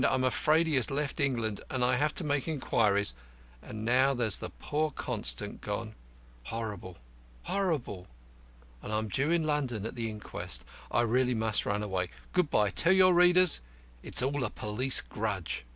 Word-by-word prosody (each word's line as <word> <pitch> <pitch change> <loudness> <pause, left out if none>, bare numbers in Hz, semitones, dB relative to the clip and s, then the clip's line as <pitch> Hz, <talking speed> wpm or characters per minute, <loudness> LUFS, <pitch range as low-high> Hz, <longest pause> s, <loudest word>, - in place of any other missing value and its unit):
I'm 130 -1 +2
afraid 155 +5 +3
he 155 -4 +1
has 125 - +1
left 145 +2 -2
England, 115 -7 -1
and 125 -2 0
I 125 0 +3
have 150 +3 +1
to - - -1
make 145 -1 -1
inquiries; 105 - +1 0.5
and 110 +1 -7
now 130 +3 +3
there's 115 -6 +2 0.2
poor 155 +1 -1
Constant 60 - -3
gone - - -4 0.5
horrible! 105 - -5 0.5
horrible! 145 - -2 0.7
and - - -7
I'm 110 0 -1
due 135 +10 +1
in 170 -1 +2
London 135 -8 -1
at 115 - -4
the 115 -2 -3
inquest. 90 - -5 0.2
I 120 - +2
must 115 -2 +1
really - - -2
run 105 +1 -1
away. 95 -3 -2 0.2
Good 180 -4 +2
by. 105 -6 +2
Tell 170 - +4
your 185 -1 +6
readers 180 - +5 0.4
it's - - +2
all 140 +1 0
a 115 - -1
police 120 +7 -1
grudge." 100 - -3
125 Hz, 165 wpm, -30 LUFS, 105-150 Hz, 0.7 s, your